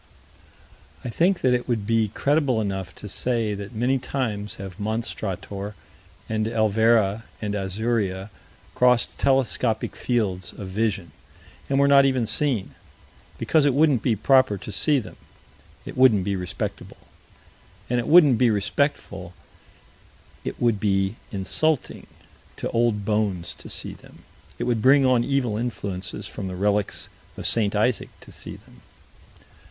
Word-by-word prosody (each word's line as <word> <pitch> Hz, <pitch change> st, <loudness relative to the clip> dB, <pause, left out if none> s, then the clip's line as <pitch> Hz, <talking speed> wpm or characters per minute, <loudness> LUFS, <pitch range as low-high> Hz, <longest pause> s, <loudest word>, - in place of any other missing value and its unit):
I -, -, -2 dB
think 175 Hz, +9 st, +2 dB
that 130 Hz, -, +3 dB
it 125 Hz, 0 st, -1 dB
would 115 Hz, -4 st, -1 dB
be 115 Hz, 0 st, +2 dB
credible 140 Hz, +2 st, +1 dB
enough 95 Hz, -4 st, -3 dB
to 105 Hz, -, -9 dB
say 115 Hz, 0 st, 0 dB
that 100 Hz, +3 st, -7 dB
many 125 Hz, +4 st, +1 dB
times 110 Hz, -6 st, -3 dB
have 95 Hz, 0 st, -9 dB
Monstrator 105 Hz, -2 st, -4 dB, 0.5 s
and 110 Hz, -1 st, -1 dB
Elvera 110 Hz, -1 st, +2 dB, 0.2 s
and 105 Hz, -1 st, -3 dB
Azuria 100 Hz, 0 st, -2 dB, 0.4 s
crossed 125 Hz, -1 st, +3 dB
telescopic 130 Hz, -4 st, +1 dB
fields 100 Hz, -7 st, -1 dB
of 95 Hz, -2 st, -8 dB
vision, 100 Hz, -3 st, -1 dB, 0.6 s
and 135 Hz, -, +1 dB
were 140 Hz, 0 st, +4 dB
not 140 Hz, -1 st, +7 dB
even 130 Hz, -3 st, +1 dB
seen 110 Hz, -2 st, +1 dB, 0.6 s
because 160 Hz, -2 st, +2 dB
it 140 Hz, -3 st, +2 dB
wouldn't 145 Hz, -5 st, +4 dB
be 115 Hz, -1 st, +1 dB
proper 130 Hz, 0 st, +3 dB
to 105 Hz, -, -8 dB
see 145 Hz, +9 st, +2 dB
them; 125 Hz, -, -6 dB, 0.7 s
it -, -, -8 dB
wouldn't 125 Hz, -7 st, +5 dB
be 100 Hz, +1 st, -1 dB
respectable, 90 Hz, -2 st, -5 dB, 0.9 s
and 125 Hz, 0 st, 0 dB
it 120 Hz, -, -3 dB
wouldn't 150 Hz, -7 st, +6 dB
be 125 Hz, -2 st, +5 dB
respectful: 100 Hz, -, -1 dB, 1.1 s
it -, -, -5 dB
would 115 Hz, -4 st, +2 dB
be 95 Hz, 0 st, +1 dB, 0.2 s
insulting 130 Hz, +9 st, -1 dB, 0.5 s
to -, -, -4 dB
old 115 Hz, -3 st, +1 dB
bones 105 Hz, -5 st, -1 dB
to -, -, -12 dB
see -, -, -4 dB
them: -, -, -17 dB, 0.3 s
it -, -, -3 dB
would 120 Hz, -3 st, 0 dB
bring 135 Hz, +3 st, +5 dB
on 125 Hz, -2 st, +3 dB
evil 125 Hz, -5 st, 0 dB
influences 100 Hz, -5 st, -4 dB
from 95 Hz, -, -6 dB
the 90 Hz, -, -5 dB
relics 100 Hz, +2 st, 0 dB, 0.3 s
of -, -, -5 dB
St. 105 Hz, -3 st, +2 dB
Isaac 110 Hz, +1 st, +1 dB
to -, -, -14 dB
see -, -, -8 dB
them. -, -, -18 dB
110 Hz, 145 wpm, -24 LUFS, 100-125 Hz, 1.1 s, not